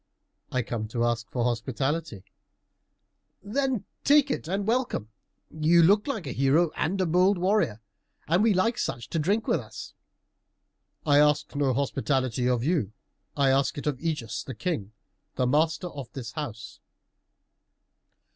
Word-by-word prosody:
"I 130 Hz, -1 st, 0 dB
come 110 Hz, -1 st, -4 dB
to 120 Hz, +2 st, -1 dB
ask 120 Hz, 0 st, -1 dB
for 120 Hz, -, -1 dB
hospitality." 125 Hz, -, -2 dB, 1.2 s
"Then 250 Hz, 0 st, -1 dB, 0.2 s
take 290 Hz, 0 st, +5 dB
it -, -, -3 dB
and 195 Hz, +3 st, -1 dB
welcome. 230 Hz, -, -1 dB, 0.4 s
You 160 Hz, +2 st, +4 dB
look 205 Hz, -, +4 dB
like 225 Hz, -, -3 dB
a 135 Hz, -, -4 dB
hero 140 Hz, +6 st, +2 dB
and 190 Hz, +5 st, -1 dB
a 185 Hz, -, +2 dB
bold 180 Hz, +4 st, +3 dB
warrior, 180 Hz, -, +1 dB, 0.5 s
and 175 Hz, +5 st, +3 dB
we 225 Hz, 0 st, +4 dB
like 225 Hz, +6 st, +1 dB
such 120 Hz, -, -3 dB
to 165 Hz, -, 0 dB
drink 200 Hz, +8 st, +1 dB
with -, -, +2 dB
us." -, -, -9 dB, 1.1 s
"I 145 Hz, -1 st, +5 dB
ask 150 Hz, 0 st, +2 dB
no 140 Hz, -2 st, +2 dB
hospitality 130 Hz, -3 st, 0 dB
of 120 Hz, -2 st, +1 dB
you; 145 Hz, -, 0 dB, 0.4 s
I 140 Hz, -2 st, +4 dB
ask 135 Hz, +1 st, +1 dB
it 145 Hz, -, -5 dB
of 145 Hz, -4 st, -1 dB
Ægeus 150 Hz, -8 st, -3 dB
the 130 Hz, -, -7 dB
King, 115 Hz, -, -3 dB, 0.4 s
the 130 Hz, -, +1 dB
master 160 Hz, +6 st, +1 dB
of 135 Hz, -6 st, -8 dB
this 125 Hz, -4 st, -6 dB
house." 115 Hz, -9 st, -7 dB
150 Hz, 150 wpm, -27 LUFS, 125-185 Hz, 1.2 s, take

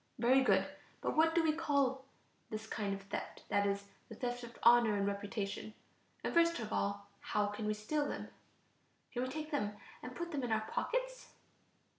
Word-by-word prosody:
Very 255 Hz, +3 st, +5 dB
good; 195 Hz, -6 st, +4 dB, 0.3 s
but -, -, -1 dB
what 325 Hz, +1 st, +4 dB
do 335 Hz, -, +5 dB
we 315 Hz, -1 st, +3 dB
call 280 Hz, -4 st, +1 dB, 0.4 s
this 215 Hz, 0 st, -4 dB
kind 210 Hz, -2 st, -2 dB
of 195 Hz, -, -9 dB
theft, 200 Hz, -, -5 dB
that 200 Hz, 0 st, +3 dB
is, 200 Hz, 0 st, 0 dB, 0.3 s
the 220 Hz, -, -8 dB
theft 245 Hz, +1 st, -2 dB
of 235 Hz, 0 st, -9 dB
honor 235 Hz, -2 st, +7 dB
and 200 Hz, -1 st, +1 dB
reputation? 200 Hz, +1 st, -3 dB, 0.5 s
And -, -, -1 dB
first 335 Hz, 0 st, +5 dB
of 220 Hz, -2 st, -4 dB
all, 200 Hz, 0 st, -1 dB
how 210 Hz, -1 st, 0 dB
can 205 Hz, +1 st, -3 dB
we 215 Hz, -, +1 dB
steal 290 Hz, +8 st, 0 dB
them? -, -, -4 dB, 0.8 s
Can 245 Hz, -, -1 dB
we 255 Hz, -, -1 dB
take 305 Hz, +2 st, -5 dB
them 210 Hz, -8 st, 0 dB, 0.3 s
and 250 Hz, +1 st, -7 dB
put 345 Hz, 0 st, -4 dB
them 290 Hz, -3 st, -1 dB
in 245 Hz, -2 st, -2 dB
our 220 Hz, 0 st, +3 dB
pockets? -, -, -2 dB
235 Hz, 190 wpm, -35 LUFS, 205-290 Hz, 0.8 s, honor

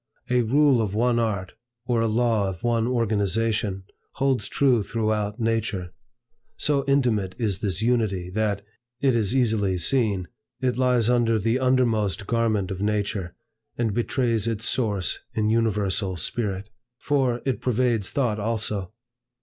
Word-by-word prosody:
A 125 Hz, 0 st, +4 dB
rule 135 Hz, +1 st, +3 dB
of 105 Hz, -2 st, -2 dB
one 120 Hz, +1 st, +2 dB
art, 100 Hz, -5 st, -2 dB, 0.3 s
or 120 Hz, -2 st, +1 dB
a 115 Hz, -, +2 dB
law 110 Hz, -3 st, +1 dB
of 90 Hz, -3 st, -8 dB
one 115 Hz, -1 st, +1 dB
organization, 110 Hz, -3 st, 0 dB, 0.3 s
holds 135 Hz, -6 st, 0 dB
true 130 Hz, -5 st, +3 dB
throughout 110 Hz, 0 st, -2 dB
nature. 110 Hz, -6 st, -1 dB, 0.6 s
So 145 Hz, -2 st, +1 dB
intimate 115 Hz, -9 st, +1 dB
is 105 Hz, -5 st, -1 dB
this 100 Hz, 0 st, -1 dB
Unity, 105 Hz, -7 st, 0 dB
that, 105 Hz, -1 st, -1 dB, 0.3 s
it 135 Hz, -2 st, +2 dB
is 115 Hz, 0 st, +1 dB
easily 110 Hz, -7 st, +2 dB
seen, 100 Hz, -4 st, +1 dB, 0.3 s
it 125 Hz, -1 st, 0 dB
lies 125 Hz, -3 st, +2 dB
under 120 Hz, -2 st, +3 dB
the 115 Hz, +4 st, +1 dB
undermost 115 Hz, -6 st, +1 dB
garment 110 Hz, -4 st, 0 dB
of 95 Hz, 0 st, -5 dB
nature, 100 Hz, -3 st, -1 dB, 0.4 s
and 115 Hz, -3 st, 0 dB
betrays 115 Hz, -1 st, 0 dB
its 110 Hz, -1 st, -1 dB
source 105 Hz, -7 st, 0 dB, 0.2 s
in 110 Hz, -1 st, +1 dB
Universal 105 Hz, -4 st, 0 dB
Spirit. 100 Hz, +2 st, -3 dB, 0.3 s
For, 130 Hz, -4 st, 0 dB
it 135 Hz, -2 st, -1 dB
pervades 120 Hz, -4 st, +1 dB
Thought 120 Hz, -6 st, 0 dB
also. 105 Hz, -3 st, -2 dB
110 Hz, 140 wpm, -24 LUFS, 100-120 Hz, 0.6 s, A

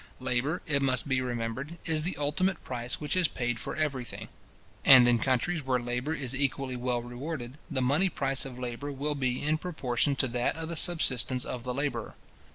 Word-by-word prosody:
Labour, 130 Hz, +6 st, -1 dB
it 140 Hz, -4 st, +1 dB
must 130 Hz, 0 st, +2 dB
be 130 Hz, -2 st, +1 dB
remembered, 125 Hz, +6 st, -3 dB
is 160 Hz, -1 st, +1 dB
the 180 Hz, +4 st, -1 dB
ultimate 160 Hz, +5 st, 0 dB
price 125 Hz, -1 st, -3 dB
which 150 Hz, +4 st, -2 dB
is 185 Hz, -3 st, +4 dB
paid 120 Hz, -3 st, -2 dB
for -, -, -5 dB
every 145 Hz, -5 st, -1 dB
thing; -, -, -8 dB, 0.5 s
and 130 Hz, -2 st, +9 dB
in 120 Hz, -1 st, +4 dB
countries 135 Hz, +7 st, +1 dB
where 130 Hz, -1 st, +1 dB
labour 125 Hz, +6 st, -2 dB
is 135 Hz, -4 st, -2 dB
equally 135 Hz, -1 st, -1 dB
well 120 Hz, -1 st, -1 dB
rewarded, 125 Hz, +2 st, -6 dB
the 135 Hz, -5 st, 0 dB
money 150 Hz, +9 st, +3 dB
price 135 Hz, -4 st, +1 dB
of 130 Hz, -2 st, -7 dB
labour 125 Hz, +3 st, -4 dB
will 145 Hz, +2 st, -2 dB
be 130 Hz, -3 st, -1 dB
in 155 Hz, +1 st, +1 dB
proportion 140 Hz, -5 st, 0 dB
to 130 Hz, -, +2 dB
that 120 Hz, +4 st, 0 dB
of 160 Hz, 0 st, -5 dB
the 170 Hz, -, -3 dB
subsistence 130 Hz, -7 st, +1 dB
of 125 Hz, -2 st, -5 dB
the 125 Hz, -, -2 dB
labourer. 135 Hz, -5 st, -2 dB
135 Hz, 195 wpm, -29 LUFS, 125-150 Hz, 0.5 s, and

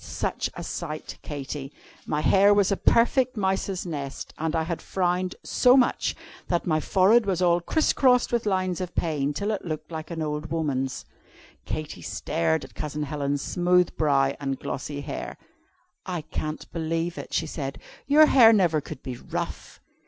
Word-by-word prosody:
Such -, -, -2 dB
a -, -, -6 dB
sight, 155 Hz, -3 st, -6 dB
Katy! 140 Hz, -1 st, -6 dB, 0.4 s
My 150 Hz, 0 st, 0 dB
hair 200 Hz, +4 st, +5 dB
was 200 Hz, -1 st, +3 dB
a -, -, +3 dB
perfect 245 Hz, +4 st, +3 dB
mouse's 190 Hz, -1 st, -1 dB
nest, 140 Hz, -5 st, -5 dB
and 160 Hz, +1 st, -1 dB
I 160 Hz, -, +1 dB
had 170 Hz, 0 st, -4 dB
frowned 180 Hz, 0 st, -1 dB
so 250 Hz, +1 st, +4 dB
much 255 Hz, -, +2 dB, 0.3 s
that 175 Hz, -1 st, 0 dB
my 155 Hz, -2 st, +2 dB
forehead 200 Hz, +7 st, +4 dB
was 185 Hz, -3 st, +1 dB
all 175 Hz, -1 st, +3 dB
criss 315 Hz, -, +1 dB
crossed 250 Hz, -2 st, +3 dB
with 235 Hz, -2 st, 0 dB
lines 185 Hz, -2 st, 0 dB
of 180 Hz, -1 st, -5 dB
pain, 150 Hz, -4 st, 0 dB
till 200 Hz, +9 st, -2 dB
it 210 Hz, -, -3 dB
looked 155 Hz, -1 st, -5 dB
like 160 Hz, -1 st, -6 dB
an 165 Hz, -2 st, -3 dB
old 150 Hz, 0 st, -3 dB
woman's." 140 Hz, -5 st, -2 dB, 0.6 s
Katy 155 Hz, -, -5 dB
stared 80 Hz, -1 st, -1 dB
at -, -, -16 dB
Cousin 150 Hz, 0 st, -4 dB
Helen's 145 Hz, -1 st, -2 dB
smooth 180 Hz, 0 st, +2 dB
brow 140 Hz, -3 st, +2 dB
and 135 Hz, -2 st, -2 dB
glossy 145 Hz, +1 st, -4 dB
hair. -, -, -6 dB, 0.7 s
"I 180 Hz, -3 st, -3 dB
can't 155 Hz, 0 st, -5 dB
believe 165 Hz, +1 st, -2 dB
it," -, -, -8 dB
she 165 Hz, -, 0 dB
said; 140 Hz, -3 st, -5 dB, 0.3 s
"your 300 Hz, +2 st, +7 dB
hair 245 Hz, -6 st, +7 dB
never 175 Hz, -8 st, +3 dB
could 135 Hz, -, -9 dB
be 125 Hz, -3 st, -5 dB
rough." -, -, -6 dB
165 Hz, 170 wpm, -26 LUFS, 150-190 Hz, 0.7 s, your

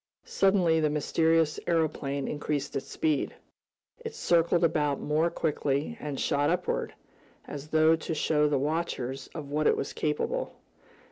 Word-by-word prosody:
Suddenly 185 Hz, -5 st, +3 dB
the 155 Hz, -1 st, +2 dB
mysterious 160 Hz, +1 st, +2 dB
aeroplane 150 Hz, -4 st, 0 dB
increased 145 Hz, -1 st, -3 dB
its 135 Hz, -, -3 dB
speed. 155 Hz, -3 st, -1 dB, 0.7 s
It 455 Hz, 0 st, -6 dB
circled 170 Hz, -, +2 dB
about 150 Hz, -4 st, +1 dB
more 155 Hz, +3 st, +1 dB
quickly, 150 Hz, +3 st, -1 dB
and 145 Hz, -2 st, -4 dB
shot 145 Hz, 0 st, +1 dB
upward, 180 Hz, +1 st, -1 dB, 0.5 s
as 145 Hz, 0 st, -7 dB
though 160 Hz, +1 st, +4 dB
to 160 Hz, 0 st, -4 dB
show 150 Hz, 0 st, +2 dB
the 145 Hz, -, +2 dB
watchers 135 Hz, -3 st, -2 dB
of 145 Hz, -3 st, -6 dB
what 150 Hz, +1 st, +1 dB
it -, -, +3 dB
was -, -, -3 dB
capable. 155 Hz, -, -2 dB
155 Hz, 140 wpm, -28 LUFS, 145-165 Hz, 0.7 s, though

